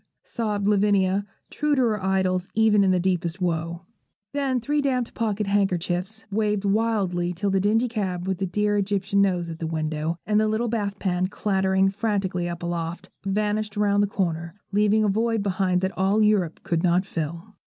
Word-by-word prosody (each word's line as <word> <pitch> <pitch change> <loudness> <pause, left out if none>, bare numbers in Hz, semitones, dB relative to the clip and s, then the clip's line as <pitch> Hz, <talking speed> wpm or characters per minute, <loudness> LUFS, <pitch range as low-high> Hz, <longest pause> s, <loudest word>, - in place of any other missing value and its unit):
sobbed 210 -3 -2
Lavinia, 200 -1 +2 0.2
true 300 0 +1
to 260 - +2
her 215 -5 0
idols 190 -1 +1
even 215 -2 +4
in 195 - +3
the 185 -1 +3
deepest 175 -1 -1
woe. 170 -1 -2 0.5
Then 275 -3 0
three 290 +5 0
damp 255 -4 -1
pocket 215 -2 -1
handkerchiefs 195 +1 -1
waved 210 -1 0
wildly 195 -5 +1
till 195 +3 -1
the 195 - +2
dingy 220 +5 +2
cab 190 -6 -3
with 190 -2 -1
the 190 - -1
dear 210 +3 +1
Egyptian 200 0 +1
nose 180 -4 +1
at 165 - -8
the 165 - -3
window, 155 0 -2
and 210 0 +2
the 215 - +2
little 220 +2 0
bath 205 -3 -2
pan 185 -2 0
clattering 190 -1 +1
frantically 195 -4 -1
up 170 0 -6
aloft, 170 0 -4
vanished 210 +1 -1
round 205 -1 +3
the 205 - +2
corner, 170 -3 -2 0.2
leaving 210 +1 +3
a - - +2
void 225 +1 +1
behind 185 -2 +1
that 190 0 -2
all 195 +3 +2
Europe 200 -6 +1
could 165 -1 0
not 180 +2 +2
fill. 170 +3 -5
195 Hz, 180 wpm, -24 LUFS, 180-210 Hz, 0.5 s, even